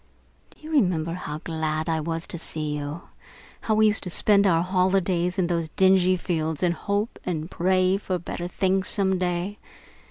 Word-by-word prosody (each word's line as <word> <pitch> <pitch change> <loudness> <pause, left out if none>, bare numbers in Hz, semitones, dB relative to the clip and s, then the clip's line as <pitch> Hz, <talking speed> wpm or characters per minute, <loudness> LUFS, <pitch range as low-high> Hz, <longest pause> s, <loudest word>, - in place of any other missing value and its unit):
"Do - - -23
you 315 - -8
remember 180 - +1
how 155 -4 -6
glad 160 -1 -2
I 160 -1 0
was 165 +1 -2
to 170 - -6
see 155 -2 -2
you? 145 +3 -5 0.6
How 220 - 0
we 220 0 +4
used 215 0 +4
to - - -4
spend 200 +3 +4
our 165 -2 +3
holidays 185 -1 +1
out - - -3
in - - +1
those 170 -2 -1
dingy 185 +1 +3
fields 160 -3 -2
and 175 -1 +3
hope 205 +5 -2
and 165 -1 -4
pray 185 +1 +2
for 190 -2 -2
better 175 0 -5
things 190 +1 0
some 190 -2 0
day? 180 +3 -2
180 Hz, 185 wpm, -25 LUFS, 165-190 Hz, 0.6 s, we